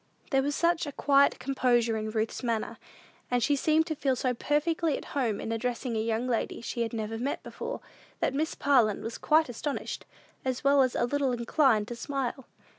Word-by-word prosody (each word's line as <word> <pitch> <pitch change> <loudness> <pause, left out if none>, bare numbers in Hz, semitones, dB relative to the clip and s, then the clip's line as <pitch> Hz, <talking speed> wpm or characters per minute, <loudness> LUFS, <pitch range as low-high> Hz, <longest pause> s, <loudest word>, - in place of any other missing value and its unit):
There 270 -1 +4
was 285 +1 -1
such 340 -1 +1
a - - -4
quiet 280 0 +4
composure 240 -4 +1
in 215 0 -2
Ruth's 220 0 -2
manner, 230 -3 -2 0.5
and 245 -1 +1
she 290 - +3
seemed 310 +3 +3
to 315 -2 -3
feel 270 -2 +1
so 250 +1 0
perfectly 300 +4 0
at - - -9
home 240 -7 0
in 225 - -4
addressing 240 +1 -2
a - - 0
young 225 +2 -1
lady 235 -3 -1
she 235 0 -4
had 230 - -1
never 225 0 -3
seen 270 +4 -1
before, 485 +1 -6 0.4
that - - +1
Miss 310 +3 -1
Parlin 245 -7 +3
was 225 +1 -5
quite 315 +1 +4
astonished, 265 +4 -4 0.4
as 260 -1 -2
well 280 0 +5
as 255 -2 +2
a - - +2
little 275 0 0
inclined 235 -2 +2
to 240 - -4
smile. 265 0 -3
255 Hz, 195 wpm, -29 LUFS, 230-285 Hz, 0.5 s, well